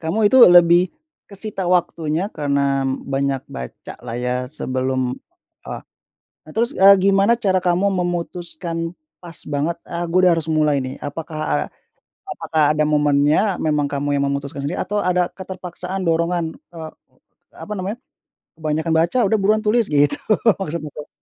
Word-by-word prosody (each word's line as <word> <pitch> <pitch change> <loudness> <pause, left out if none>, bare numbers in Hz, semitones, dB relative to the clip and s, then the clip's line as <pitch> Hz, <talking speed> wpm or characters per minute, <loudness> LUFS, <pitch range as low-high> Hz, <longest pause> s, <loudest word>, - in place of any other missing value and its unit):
kamu 165 +6 -2
itu 260 - +7
lebih 175 0 +6 0.4
kesita 200 -2 -4
waktunya 170 +1 0
karena 140 -2 0 0.2
banyak 135 -1 -1
baca 65 -1 -9
lah 120 -1 -6
ya, 125 +1 -2 0.2
sebelum 130 -2 -2 0.7
eee, - - -5 0.7
nah 155 - -12
terus, 235 +5 +1
eee, 195 +1 +7
gimana 195 +3 +4
cara 190 -5 +1
kamu 180 +2 +1 0.2
memutuskan 175 -1 -3 0.4
pas 170 -3 -8
banget, 150 +4 -2
"Ah 170 0 -5
gua 180 - +2
udah 180 - +6
harus 165 -1 -2
mulai 150 -3 +2
nih"? 130 +1 -6
Apakah 155 +2 -6
a - - +3 0.8
apakah 160 -1 0
ada 155 - +2
momennya 150 +5 +2
memang 150 -2 0
kamu 140 0 -3
yang - - +1
memutuskan 140 0 -4
sendiri, 140 +4 -3
atau 205 +1 -1
ada 180 -1 0
keterpaksaan 185 0 -6
dorongan 170 0 0 0.2
eee, 160 -2 -8 0.7
apa 210 - -7
namanya, 195 +3 -4 0.6
"Kebanyakan 160 +1 -1
baca, 170 +9 +1
udah 220 - +3
buruan 215 +2 +2
tulis!" 225 +2 +3
gitu, 145 0 +3 0.4
maksudnya 155 -3 -4
tuh. 150 - -7
165 Hz, 145 wpm, -20 LUFS, 145-185 Hz, 0.8 s, itu